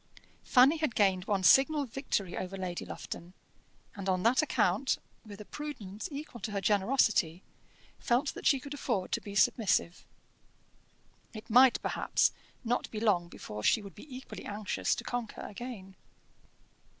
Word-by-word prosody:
Fanny 270 +5 +5
had 310 -7 -1
gained 190 -3 +2
one 200 -3 0
signal 280 +7 +5
victory 225 -7 -3
over 190 +1 -5
Lady 180 -2 -4
Lufton, 175 +2 -8 0.6
and 195 -1 -4
on 185 -1 +1
that 240 +5 +4
account, 260 -4 +1 0.3
with 205 -3 -11
a 210 - -9
prudence 215 -10 -7
equal 280 -5 -7
to 215 - -3
her 200 - 0
generosity, 195 -4 +2 0.6
felt 255 +4 +1
that - - -3
she 275 - +4
could 280 +2 -8
afford 235 -9 -2
to - - 0
be 200 -1 -8
submissive. 195 -4 +2 1.3
It 215 +1 -9
might, 250 +2 +7
perhaps, - - +1 0.3
not 240 +1 -1
be 215 - -5
long 200 -6 +2
before 105 -10 -8
she 210 - +3
would 200 - -10
be 270 +7 -14
equally 265 - -9
anxious 205 0 -1
to 235 - -6
conquer 240 -2 -4
again. 205 -4 -8
215 Hz, 150 wpm, -31 LUFS, 190-255 Hz, 1.3 s, might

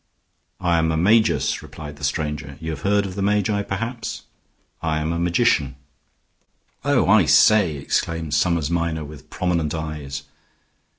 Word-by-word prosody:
"I 85 -2 +2
am 80 0 +1
a 80 - 0
magus," 110 +7 +3
replied 75 -2 -10
the 75 - -13
stranger. 75 -1 -3
"You 80 0 -4
have 75 - -6
heard 100 0 +2
of 95 - -5
the 100 - -4
magi, 105 +1 +1
perhaps? 115 +5 -4 0.6
I 80 -1 0
am 80 +2 -1
a 85 - -2
magician." 85 - +2 1.1
"Oh, 140 -7 +2
I 100 -2 +5
say!" 100 -1 +5
exclaimed 80 +2 -2
Summers 80 0 +1
Minor, 85 -2 -1
with 75 -1 -12
prominent 85 -4 -1
eyes. 75 -3 -5
85 Hz, 150 wpm, -22 LUFS, 75-100 Hz, 1.1 s, I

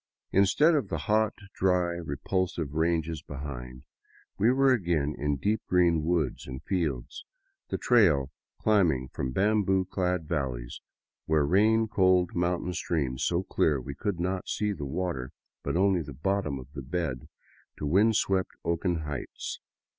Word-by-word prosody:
Instead 100 - +4
of 145 -4 +1
the 80 - -1
hot, 105 +8 +1 0.2
dry, 90 -2 +2
re 85 -5 -4
pulsive 85 0 -2
ranges 80 -1 0
behind, 65 -3 -7 0.6
we 110 +5 +5
were 135 0 +4
again 85 - 0
in 75 0 -1
deep 105 +10 0
green 85 -3 +3
woods 80 -5 -1
and 65 0 -7
fields, 80 -11 -2 0.5
the - - -1
trail 80 - +3 0.3
climbing 85 -12 +2
from 65 - -3
bamboo 95 +1 +2
clad 90 -3 -1
valleys 65 -7 -3 0.5
where 75 -2 +3
ran 110 +7 +3
cold 95 -4 +3
mountain 90 0 -1
streams 70 -6 -1
so 85 +1 +1
clear 75 -6 +1
we 65 +3 -6
could 100 +3 -3
not 90 +1 -2
see 105 -1 0
the 75 -6 -5
water, 70 -5 -3 0.3
but - - -1
only 95 -1 +3
the 70 -2 -8
bottom 85 0 -1
of 65 +2 -11
the 70 - -6
bed, 65 -3 -3 0.5
to - - -4
wind 100 +9 +4
swept 95 -2 +1
oaken 85 0 0
heights. 75 -4 -5
85 Hz, 150 wpm, -28 LUFS, 70-95 Hz, 0.6 s, we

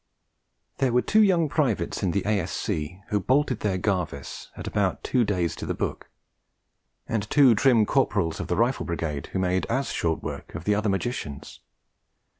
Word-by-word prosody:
There 130 -2 +2
were 125 - +3
two 220 - +4
young 180 -6 +4
Privates 125 - 0
in 95 - +1
the 95 +2 0
A.S.C. 95 -4 -2
who 105 -1 +1
bolted 135 +8 +1
their 100 -3 0
Garvice 90 -8 -3
at - - -6
about - - -1
two 125 - +2
days 90 -5 0
to - - -6
the - - -1
book; - - -4 1.0
and 110 -2 -2
two 140 -5 +6
trim 115 -1 +4
Corporals 100 -10 +1
of - - -4
the 90 - 0
Rifle 120 +4 +1
Brigade 80 -5 -3
who - - -4
made 95 0 0
as 135 +1 -1
short 80 -2 -1
work - - -6
of - - -5
the 105 - +2
other 105 +1 0
magicians. 95 - -4
100 Hz, 175 wpm, -26 LUFS, 90-125 Hz, 1.0 s, two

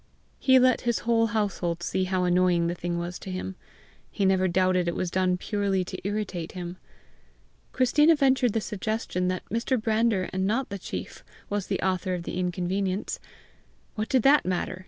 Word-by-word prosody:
He 260 -1 +5
let 255 -1 +4
his 235 -1 0
whole 230 -1 +3
household 195 -6 -1
see 185 +1 0
how 185 0 0
annoying 180 -1 +3
the 170 - 0
thing 175 0 -3
was 175 +1 -4
to - - -8
him. 185 +1 -4 0.5
He 200 - -1
never 190 0 +3
doubted 185 0 +2
it 170 - -1
was 180 -2 -2
done 185 -1 +1
purely 195 -1 -1
to - - -7
irritate 200 -5 -3
him. 180 0 -6 0.9
Christina 295 +6 +4
ventured 260 -5 +3
the 225 - 0
suggestion 210 -3 -2
that 185 0 -2
Mr. 230 +3 0
Brander 220 -3 +1
and 190 0 0
not 245 +5 0
the 200 -1 -5
chief - - -7 0.3
was 205 -2 -1
the 195 - -1
author 185 0 0
of 175 - -5
the 175 - -4
inconvenience. 185 +2 -2 0.7
What 215 0 -3
did 260 -4 +3
that 290 +2 +6
matter! 180 0 -2
190 Hz, 180 wpm, -26 LUFS, 180-225 Hz, 0.9 s, that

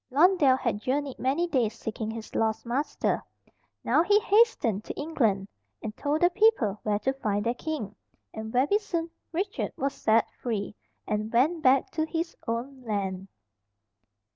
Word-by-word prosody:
Blondel 295 -2 +5
had 235 -5 -2
journeyed 275 +2 -2
many 275 +7 +1
days 240 -9 0
seeking 220 0 -4
his 220 0 -7
lost 220 0 0
master. 260 +6 -1 0.6
Now - - +4
he 410 +5 +4
hastened 410 - +3
to - - -6
England, 225 -11 0 0.4
and 215 -1 -5
told 295 +2 -1
the 350 +1 +5
people 360 - +3
where 210 -1 0
to 265 +6 0
find 210 -6 -1
their 235 - +2
king, 250 -7 -5 0.4
and 220 0 -6
very 275 - +3
soon 340 -6 -3 0.2
Richard 380 +4 -2
was 275 +1 -1
set 220 +1 +2
free, 210 -4 -4 0.3
and 215 +1 -2
went 305 +8 +2
back 265 -1 +4
to 315 0 -1
his 330 +1 -3
own 250 +4 -3
land. 195 -4 -3
260 Hz, 155 wpm, -27 LUFS, 220-320 Hz, 0.6 s, Blondel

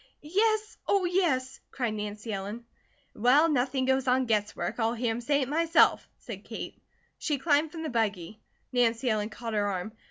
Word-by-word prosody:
"Yes, 430 +6 +1
oh, 395 -2 +3
yes!" 285 -8 0
cried 240 -5 -2
Nancy 210 +1 -5
Ellen. 205 +4 -5 0.5
"Well, 255 +8 +4
nothing 260 -2 +1
goes 265 0 +1
on 255 +1 +3
guess 210 -3 0
work. 230 - -3
I'll 225 +1 +1
hear 235 0 0
him 230 +2 -3
say 285 +4 +1
it, 260 - -1
myself," 330 +3 +3
said - - -9
Kate. - - -7 0.4
She 295 -3 -1
climbed 295 +2 +2
from 325 -2 -6
the 315 - -3
buggy. 215 -4 -2 0.3
Nancy 240 0 +2
Ellen 210 0 -1
caught 230 +1 -6
her 205 -1 +1
arm. 195 +1 -3
250 Hz, 180 wpm, -28 LUFS, 220-295 Hz, 0.5 s, Well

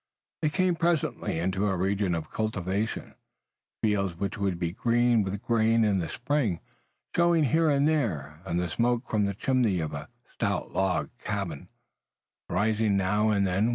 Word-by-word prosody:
They 155 - +2
came 185 +3 +2
presently 165 - 0
into 95 +4 0
a 95 -2 0
region 95 0 0
of 80 -1 -5
cultivation, 105 0 -2 0.7
fields 100 -5 +1
which 100 +3 -3
would 100 -3 -1
be 85 -1 -2
green 120 +3 +2
with 100 0 -3
grain 115 0 +3
in 100 -2 +2
the 80 - -3
spring, 125 - 0 0.6
showing 170 -2 +4
here 160 +3 +3
and 140 0 +3
there, 85 - -1
and 85 -2 -1
the 90 - 0
smoke 120 +7 0
from 105 -2 +1
the 100 -1 -2
chimney 120 -5 +1
of 80 -2 -3
a 70 - -6 0.2
stout 100 -5 -2
log 95 -1 0
house 100 -8 -3 0.8
rising 105 +2 +1
now 105 +3 +2
and 100 -2 +2
then. 95 +5 +1
105 Hz, 160 wpm, -28 LUFS, 95-120 Hz, 0.8 s, showing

